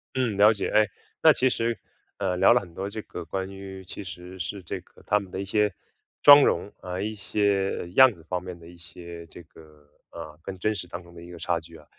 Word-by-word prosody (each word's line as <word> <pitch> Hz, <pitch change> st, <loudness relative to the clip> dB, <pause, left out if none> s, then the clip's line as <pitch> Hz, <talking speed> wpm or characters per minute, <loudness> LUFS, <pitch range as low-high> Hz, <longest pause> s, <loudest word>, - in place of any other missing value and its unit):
嗯， 120 Hz, -6 st, 0 dB
了 105 Hz, +2 st, +7 dB
解。 100 Hz, -, -3 dB
哎， 105 Hz, 0 st, +4 dB, 0.4 s
那 -, -, +8 dB
其 130 Hz, 0 st, +2 dB
实， 115 Hz, -1 st, -1 dB, 0.4 s
呃， 90 Hz, -, -1 dB
聊 95 Hz, +5 st, +6 dB
了 120 Hz, -, +4 dB
很 85 Hz, -3 st, -13 dB
多 95 Hz, +3 st, -4 dB
这 110 Hz, +1 st, -6 dB
个 90 Hz, -, -8 dB
关 95 Hz, +3 st, -4 dB
于 95 Hz, -1 st, -9 dB
其 100 Hz, -, -8 dB
实 90 Hz, 0 st, -10 dB
是 95 Hz, +3 st, -4 dB
这 -, -, -5 dB
个 -, -, -22 dB
他 105 Hz, +1 st, +2 dB
们 95 Hz, -2 st, -10 dB
的 95 Hz, -, -5 dB
一 -, -, -4 dB
些 105 Hz, 0 st, +1 dB, 0.5 s
妆 145 Hz, -1 st, +10 dB
容， 90 Hz, +4 st, +1 dB
呃， 90 Hz, +1 st, -4 dB
一 110 Hz, +1 st, -3 dB
些 100 Hz, -3 st, 0 dB
样 130 Hz, +5 st, +7 dB
子 80 Hz, -, -18 dB
方 90 Hz, +1 st, -3 dB
面 90 Hz, -1 st, -8 dB
的 85 Hz, 0 st, -15 dB
一 85 Hz, 0 st, -14 dB
些 85 Hz, 0 st, -11 dB
这 85 Hz, -, -13 dB
个， 75 Hz, -2 st, -19 dB, 0.2 s
呃， 80 Hz, -2 st, -9 dB
跟 95 Hz, +1 st, -7 dB
真 110 Hz, +4 st, 0 dB
实 90 Hz, -3 st, -6 dB
当 85 Hz, +1 st, -7 dB
中 85 Hz, 0 st, -17 dB
的 85 Hz, -, -12 dB
一 85 Hz, -, -11 dB
个 85 Hz, -, -9 dB
差 85 Hz, +1 st, -1 dB
距 80 Hz, 0 st, -13 dB
啊。 75 Hz, -, -18 dB
95 Hz, 260 characters per minute, -26 LUFS, 85-105 Hz, 0.5 s, 妆